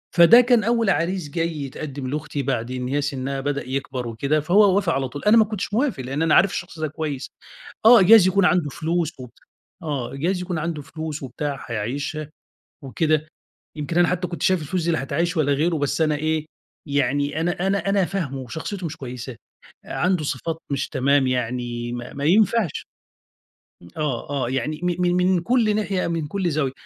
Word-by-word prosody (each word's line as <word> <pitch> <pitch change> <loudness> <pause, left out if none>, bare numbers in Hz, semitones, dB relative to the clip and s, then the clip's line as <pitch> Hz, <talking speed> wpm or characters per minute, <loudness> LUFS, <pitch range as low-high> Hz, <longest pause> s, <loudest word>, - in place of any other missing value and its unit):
فده 185 +8 +8
كان 245 -2 +3
أوّل 230 -1 +2
عريس 180 -2 0
جاي 165 +1 -2
يتقدّم 135 0 -6
لأختي، 145 0 -3
بعد 125 -2 -2
إن 125 0 -3
هي 145 +2 0
سنّها 135 -1 -3
بدأ 140 -1 -3
يكبَر 130 -2 -3
وكده، 140 +7 0
فهو 190 +5 +4
وافق 195 -5 +1
على 135 -1 -1
طول، 145 - -8
أنا 215 +2 +5
ما 220 - +6
كنتش 210 -1 -5
موافق، 230 - 0
لأن 135 +5 -3
أنا 160 -1 +3
عارف 195 +1 +5
الشخص 175 -2 -6
ده 155 - -1
كويّس، 150 -3 -4 0.6
آه 230 -3 +8
جايز 205 0 +8
يكون 195 +1 +3
عنده 175 -5 +2
فلوس، 165 +1 -1
و 125 - -8 0.5
آه 140 -6 -3
جايز 180 +6 -1
يكون 180 -3 -3
عنده 155 -1 -3
فلوس 155 0 -6
وبتاع، 140 +2 -4
حيعيشها 140 +7 -4 0.5
وكده، 155 +3 0 0.5
يمكن 150 +2 -3
أنا 175 0 +5
حتّى 180 0 -1
كنت 170 - -6
شايف 185 -3 +3
الفلوس 170 +3 -2
دي 170 - +2
لا 160 - -1
هتعيّش 165 +5 -1
ولا 145 -2 +2
غيرُه، 160 +3 +1
بس 145 +2 -1
أنا 155 -1 +2
إيه، 155 +1 -1 0.4
يعني 145 +2 0
أنا 175 +2 -1
أنا 195 0 0
أنا 195 -2 +3
فاهمُه 160 -9 -3
وشخصيته 165 - -5
مش 160 -1 -5
كويّسة، 125 -1 -7 0.5
عنده 180 -3 0
صفات 160 +4 -3
مش 135 -1 -1
تمام 140 -1 +2
يعني 120 -1 -2
ما 120 0 -7
ما 140 +1 -4
ينفعش، 210 +1 +2 1.0
م 85 - -13
آه، 145 -4 -3
آه 135 -4 -1
يعني 135 +5 -2
م 180 0 -1
من 175 0 +2
من 180 0 +3
كل 220 +1 +2
ناحية 200 -3 -1
من 165 -3 -2
كل 185 +1 -1
زاوية، 145 -4 0
155 Hz, 190 wpm, -23 LUFS, 140-180 Hz, 1.0 s, فده